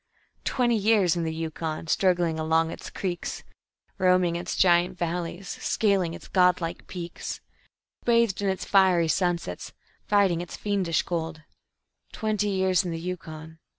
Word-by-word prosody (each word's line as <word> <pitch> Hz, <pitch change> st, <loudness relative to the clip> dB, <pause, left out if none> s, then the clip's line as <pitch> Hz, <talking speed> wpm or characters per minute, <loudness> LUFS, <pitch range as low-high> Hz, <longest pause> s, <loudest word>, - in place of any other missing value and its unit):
"Twenty 240 Hz, -3 st, +2 dB
years 205 Hz, -5 st, +3 dB
in 170 Hz, -1 st, -1 dB
the 160 Hz, -, -1 dB
Yukon, 160 Hz, 0 st, -4 dB
struggling 175 Hz, -1 st, +1 dB
along 160 Hz, +1 st, +2 dB
its -, -, -8 dB
creeks; 180 Hz, -3 st, -4 dB, 0.6 s
Roaming 180 Hz, -2 st, +3 dB
its 175 Hz, +1 st, -3 dB
giant 180 Hz, 0 st, +3 dB
valleys, 175 Hz, +2 st, -3 dB
scaling 190 Hz, -6 st, 0 dB
its -, -, -11 dB
god 180 Hz, -2 st, +4 dB
like 170 Hz, 0 st, -5 dB
peaks; 175 Hz, -2 st, -6 dB, 0.6 s
Bathed 230 Hz, -4 st, +2 dB
in 200 Hz, -, +1 dB
its 190 Hz, -, -2 dB
fiery 185 Hz, -4 st, +4 dB
sunsets, 170 Hz, -, -1 dB, 0.3 s
fighting 195 Hz, -5 st, +3 dB
its 175 Hz, -, -7 dB
fiendish 190 Hz, -6 st, 0 dB
cold 160 Hz, -2 st, -4 dB, 0.7 s
Twenty 210 Hz, -1 st, -1 dB
years 190 Hz, -2 st, +2 dB
in 180 Hz, -, -4 dB
the 165 Hz, -1 st, -3 dB
Yukon... 160 Hz, -2 st, -7 dB
175 Hz, 140 wpm, -26 LUFS, 165-190 Hz, 0.7 s, god